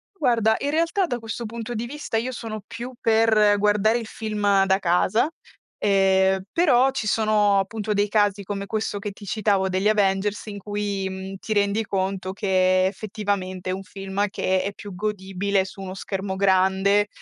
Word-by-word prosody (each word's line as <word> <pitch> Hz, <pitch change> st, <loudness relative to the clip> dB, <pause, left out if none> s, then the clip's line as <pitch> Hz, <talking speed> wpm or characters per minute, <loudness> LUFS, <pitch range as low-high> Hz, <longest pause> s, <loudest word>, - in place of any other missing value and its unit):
Guarda, 230 Hz, -, +2 dB
in 285 Hz, -, -1 dB
realtà 335 Hz, +4 st, +1 dB
da 245 Hz, -6 st, -3 dB
questo 225 Hz, +1 st, -5 dB
punto 230 Hz, +2 st, -6 dB
di 225 Hz, +2 st, -3 dB
vista 275 Hz, -3 st, -4 dB
io 245 Hz, +3 st, -1 dB
sono 225 Hz, -3 st, -6 dB
più 240 Hz, +4 st, -7 dB
per 220 Hz, -2 st, +4 dB
guardare 210 Hz, +3 st, +3 dB
il 225 Hz, -, -7 dB
film 205 Hz, -3 st, +1 dB
da 190 Hz, 0 st, +2 dB
casa, 185 Hz, -, +2 dB, 0.5 s
ehm, 190 Hz, -1 st, +3 dB
però 270 Hz, -7 st, +4 dB
ci 265 Hz, -5 st, -3 dB
sono 210 Hz, -2 st, +3 dB
appunto 210 Hz, +2 st, -2 dB
dei 205 Hz, 0 st, +1 dB
casi, 205 Hz, -1 st, +2 dB
come 200 Hz, 0 st, -4 dB
questo 215 Hz, 0 st, -2 dB
che 205 Hz, 0 st, -5 dB
ti 205 Hz, +1 st, -13 dB
citavo 200 Hz, -2 st, +1 dB
degli 190 Hz, +2 st, 0 dB
Avengers, 205 Hz, 0 st, +1 dB
in 205 Hz, -1 st, -6 dB
cui, 205 Hz, -1 st, -3 dB
mhmm, 190 Hz, 0 st, -6 dB
ti 215 Hz, -, -3 dB
rendi 205 Hz, +1 st, +1 dB
conto 190 Hz, -1 st, -2 dB
che 185 Hz, -2 st, +2 dB
effettivamente 190 Hz, -2 st, -3 dB
è -, -, 0 dB
un 195 Hz, +1 st, -5 dB
film 195 Hz, +1 st, -3 dB
che 185 Hz, -1 st, 0 dB
è 200 Hz, +1 st, -3 dB
più 200 Hz, -1 st, -9 dB
godibile 195 Hz, -1 st, -1 dB
su 195 Hz, +1 st, -10 dB
uno 185 Hz, -1 st, -6 dB
schermo 195 Hz, 0 st, -4 dB
grande, 190 Hz, +1 st, +3 dB
205 Hz, 175 wpm, -23 LUFS, 190-220 Hz, 0.5 s, per